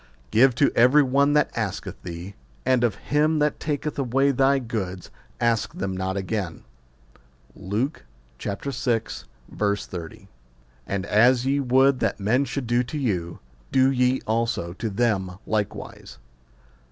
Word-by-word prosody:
Give 125 Hz, +2 st, +5 dB
to 140 Hz, -, +3 dB
every 125 Hz, +5 st, +6 dB
one 140 Hz, +2 st, +2 dB
that 150 Hz, -1 st, +2 dB
asketh 110 Hz, -5 st, -4 dB
thee; 90 Hz, +3 st, -7 dB, 0.3 s
and 130 Hz, -1 st, +3 dB
of 115 Hz, -4 st, +2 dB
him 150 Hz, +7 st, +1 dB
that 150 Hz, 0 st, +1 dB
taketh 150 Hz, -1 st, -3 dB
away 135 Hz, +2 st, +2 dB
thy 135 Hz, +1 st, +3 dB
goods 105 Hz, -8 st, -4 dB, 0.3 s
ask 115 Hz, -2 st, 0 dB
them 95 Hz, 0 st, -3 dB
not 95 Hz, +1 st, -2 dB
again. 95 Hz, -3 st, -3 dB, 0.9 s
Luke 115 Hz, +11 st, -3 dB, 0.4 s
vi. 100 Hz, -, -2 dB
30. 100 Hz, -, -4 dB, 0.6 s
And 100 Hz, -1 st, -2 dB
as 120 Hz, +5 st, +4 dB
ye 140 Hz, +1 st, +1 dB
would 130 Hz, 0 st, +3 dB
that -, -, -1 dB
men 120 Hz, +8 st, +2 dB
should 135 Hz, 0 st, -4 dB
do 120 Hz, +1 st, +2 dB
to 125 Hz, +5 st, -5 dB
you, 90 Hz, -, -2 dB, 0.3 s
do 130 Hz, 0 st, +4 dB
ye 125 Hz, 0 st, +2 dB
also 115 Hz, -6 st, -1 dB
to 110 Hz, +4 st, -4 dB
them 95 Hz, -4 st, 0 dB
likewise. 105 Hz, -2 st, -4 dB
120 Hz, 135 wpm, -24 LUFS, 100-135 Hz, 0.9 s, every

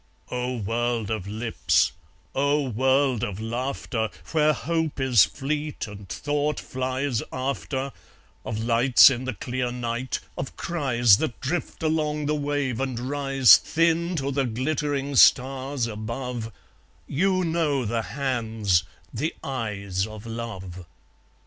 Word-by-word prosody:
O 125 Hz, 0 st, -2 dB
world 115 Hz, 0 st, -1 dB
of 105 Hz, -4 st, -3 dB
lips, 110 Hz, -, +1 dB, 0.4 s
O 140 Hz, +1 st, +1 dB
world 130 Hz, +1 st, +2 dB
of 100 Hz, -1 st, -3 dB
laughter, 115 Hz, -1 st, -2 dB, 0.2 s
Where 155 Hz, -1 st, +4 dB
hope 160 Hz, -1 st, -2 dB
is 125 Hz, -7 st, +5 dB
fleet 150 Hz, +2 st, -3 dB
and 100 Hz, -2 st, -10 dB
thought 145 Hz, +6 st, -1 dB
flies 130 Hz, -1 st, -2 dB
after, 135 Hz, +1 st, -3 dB, 0.5 s
Of 110 Hz, -, -4 dB
lights 120 Hz, +3 st, +6 dB
in 130 Hz, 0 st, -3 dB
the 130 Hz, -3 st, -3 dB
clear 125 Hz, +4 st, -2 dB
night, 120 Hz, +1 st, -3 dB, 0.2 s
of 135 Hz, -, -5 dB
cries 120 Hz, -, +3 dB
That 140 Hz, -5 st, -3 dB
drift 160 Hz, +4 st, -3 dB
along 150 Hz, -1 st, 0 dB
the 150 Hz, -, +1 dB
wave 145 Hz, -4 st, -1 dB
and 130 Hz, -2 st, -2 dB
rise 135 Hz, 0 st, +5 dB
Thin 170 Hz, +2 st, +1 dB
to 140 Hz, -3 st, -1 dB
the 135 Hz, 0 st, 0 dB
glittering 140 Hz, +3 st, -1 dB
stars 135 Hz, 0 st, +4 dB
above, 115 Hz, +1 st, -5 dB, 0.6 s
You 185 Hz, +5 st, +1 dB
know 160 Hz, -6 st, 0 dB
the 115 Hz, +1 st, 0 dB
hands, 110 Hz, -8 st, 0 dB, 0.3 s
the 155 Hz, +3 st, -2 dB
eyes 100 Hz, -7 st, -2 dB
of 110 Hz, 0 st, -10 dB
love! 95 Hz, -6 st, -7 dB
130 Hz, 125 wpm, -25 LUFS, 115-145 Hz, 0.6 s, lights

